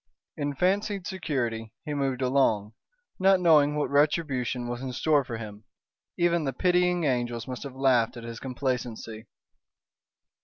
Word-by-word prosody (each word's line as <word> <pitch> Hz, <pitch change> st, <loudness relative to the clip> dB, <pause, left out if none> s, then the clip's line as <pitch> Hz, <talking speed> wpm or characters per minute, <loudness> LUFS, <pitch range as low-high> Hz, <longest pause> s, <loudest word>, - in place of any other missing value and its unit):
In 145 Hz, -1 st, -3 dB
fancied 195 Hz, +3 st, 0 dB
security 120 Hz, -, -3 dB
he 150 Hz, -, -3 dB
moved 135 Hz, -2 st, -1 dB
along, 115 Hz, -5 st, +2 dB, 0.5 s
not 190 Hz, 0 st, +5 dB
knowing 150 Hz, -4 st, +5 dB
what 150 Hz, -1 st, -1 dB
retribution 140 Hz, -5 st, +1 dB
was 120 Hz, 0 st, -4 dB
in 130 Hz, -1 st, -4 dB
store 150 Hz, +1 st, +2 dB
for 120 Hz, -2 st, -5 dB
him. 105 Hz, -1 st, -9 dB, 0.5 s
Even 170 Hz, -1 st, +2 dB
the 135 Hz, -2 st, -2 dB
pitying 180 Hz, +3 st, +2 dB
angels 120 Hz, -4 st, -1 dB
must 125 Hz, -1 st, -5 dB
have 140 Hz, -2 st, -7 dB
laughed 125 Hz, -3 st, +2 dB
at 120 Hz, -, -8 dB
his 115 Hz, -1 st, -7 dB
complacency. 120 Hz, -4 st, -4 dB
135 Hz, 145 wpm, -27 LUFS, 120-155 Hz, 0.5 s, not